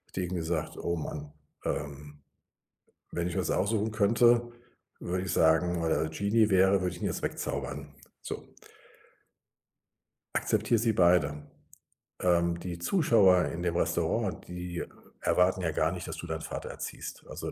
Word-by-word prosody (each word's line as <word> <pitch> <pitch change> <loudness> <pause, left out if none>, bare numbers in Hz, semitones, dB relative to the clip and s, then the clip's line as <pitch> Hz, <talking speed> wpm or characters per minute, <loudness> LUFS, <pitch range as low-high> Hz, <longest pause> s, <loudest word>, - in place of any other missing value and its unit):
die 90 - -1
irgendwie 90 -2 -2
sagt: 80 -2 -2
„Oh 85 - -1
Mann. 75 -2 -6 0.3
Ähm, 75 0 -5 0.9
wenn 85 0 -1
ich 90 - -4
was - - 0
aussuchen 110 +1 +1
könnte, 120 +3 +4 0.5
würde 90 +1 -2
ich 90 - -2
sagen 85 +1 +3
oder 80 -1 +1
Genie 105 +5 +2
wäre, 95 0 +4
würde 90 -1 -1
ich - - -11
ihn - - 0
jetzt - - -3
wegzaubern,“ - - -4 0.3
so. - - -6 1.9
Akzeptier 110 +2 +2
sie 115 +1 +2
beide. 80 -6 +3 0.8
Ähm, 85 -1 +2
die 85 -2 -5
Zuschauer 95 - +4
in 85 - -5
dem 85 -1 -1
Restaurant, 90 - 0
die 90 -1 -5 0.3
erwarten 90 +1 +2
ja 80 -2 0
gar 80 +1 +1
nicht, 90 -1 -6
dass - - -4
du 85 - -7
deinen 80 -1 -3
Vater - - -5
erziehst. - - -7
Also, - - -5
90 Hz, 145 wpm, -29 LUFS, 80-100 Hz, 1.9 s, könnte